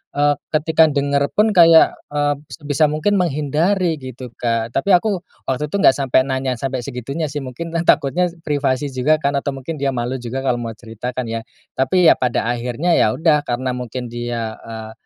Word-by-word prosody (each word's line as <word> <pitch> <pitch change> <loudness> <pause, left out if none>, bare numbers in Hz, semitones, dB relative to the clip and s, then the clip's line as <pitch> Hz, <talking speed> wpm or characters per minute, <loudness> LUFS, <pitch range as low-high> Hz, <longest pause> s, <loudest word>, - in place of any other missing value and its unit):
eee, 145 0 +3 0.2
ketika 160 +1 +3
denger 140 0 +1
pun 215 +1 +3
kayak, 165 -2 +7 0.2
eee, 145 0 +1 0.2
sebisa 145 -1 -1
mungkin 195 +7 +1
menghindari 165 +3 +1
gitu, 130 -1 -8
Kak, 115 -1 -1
tapi 195 +9 +1
aku 190 0 0 0.3
waktu 145 +3 -1
itu - - -2
nggak 135 - +5
sampai 130 -2 +2
nanya 130 -1 -1
sampai 130 -1 -2
segitunya 140 +5 -4
sih 145 - -3
mungkinlah 165 +6 -4
takutnya 155 +5 +3 0.2
privasi 145 -1 0
juga 130 +4 +2
kan 140 - +2
atau 140 0 -3
mungkin 135 +5 -6
dia 135 -1 0
malu 120 +2 -2
juga 125 +2 -4
kalau 125 -2 +1
mau 115 -1 -5
cerita 115 +2 -7
kan 130 -2 -3
ya. 115 0 -4 0.3
Tapi 170 +7 +3
ya - - +4
pada 125 -2 0
akhirnya 125 +8 -1
ya 105 - +3
udah 155 +1 +3
karena 125 +1 -1
mungkin 125 0 -5
dia, 120 -2 -4
eee, 110 -1 -8
135 Hz, 185 wpm, -19 LUFS, 125-155 Hz, 0.3 s, kayak